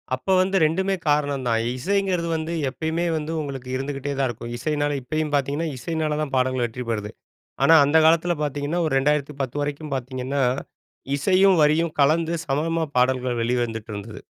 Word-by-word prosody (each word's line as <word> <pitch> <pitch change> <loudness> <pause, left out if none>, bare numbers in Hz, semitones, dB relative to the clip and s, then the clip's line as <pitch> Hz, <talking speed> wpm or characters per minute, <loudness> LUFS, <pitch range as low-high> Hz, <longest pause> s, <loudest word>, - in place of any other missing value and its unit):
அப்போ 130 +9 -1
வந்து 190 +1 +1
2மே 190 +5 +1
காரணம் 145 -3 +1
தான். 115 -1 +2 0.2
இசைங்கிறது 190 +1 0
வந்து 160 +1 -3 0.2
எப்பயுமே 160 +5 -2
வந்து 155 +1 -4
உங்களுக்கு 135 -3 -6
இருந்துகிட்டே 135 +1 -3
தான் 135 - +2
இருக்கும். 120 0 -6
இசையினால 145 +2 -1
இப்பயும் 155 +4 -2
பார்த்தீங்கன்னா, 145 +4 -1
இசையினால 155 +3 -2
தான் 145 -3 -4
பாடல்கள் 130 -1 +1
வெற்றி 120 +2 -6
பெறுது. 105 -2 -2 0.5
ஆனா, 165 - +7
அந்த 145 +3 +3
காலத்தில 170 +2 +3
பார்த்தீங்கன்னா, 145 +3 -2
ஒரு 145 - -2
2010 140 -1 -1
வரைக்கும் 145 0 -4
பார்த்தீங்கன்னா 130 +2 -2 0.7
இசையும் 185 +4 +4
வரியும் 155 +2 +3
கலந்து 160 +4 +3
சமமா 160 +4 0
பாடல்கள் 125 -1 +1
வெளிவந்துட்டிருந்தது. 115 -3 -3
145 Hz, 145 wpm, -23 LUFS, 130-160 Hz, 0.7 s, ஆனா